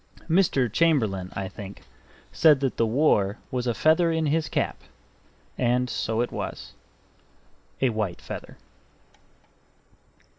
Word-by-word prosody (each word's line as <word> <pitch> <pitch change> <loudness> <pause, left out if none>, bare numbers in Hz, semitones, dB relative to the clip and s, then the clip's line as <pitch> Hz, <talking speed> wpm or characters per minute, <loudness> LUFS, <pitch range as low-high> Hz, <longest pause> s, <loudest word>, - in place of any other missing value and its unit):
Mr. 165 -6 +3
Chamberlain, 110 - +1
I 100 -1 -3
think, 100 +1 -10 0.5
said 150 -3 +5
that 135 -2 -1
the 115 - +2
war 110 -5 +2
was 125 -1 -2
a 120 - 0
feather 160 +6 +3
in 160 -1 0
his 155 +2 0
cap - - -2 0.8
and 125 +1 +1
so 110 +1 -1
it 120 - -2
was: - - -6 1.1
a 130 - +4
white 105 -6 -2
feather. - - -8
125 Hz, 120 wpm, -25 LUFS, 110-155 Hz, 1.1 s, said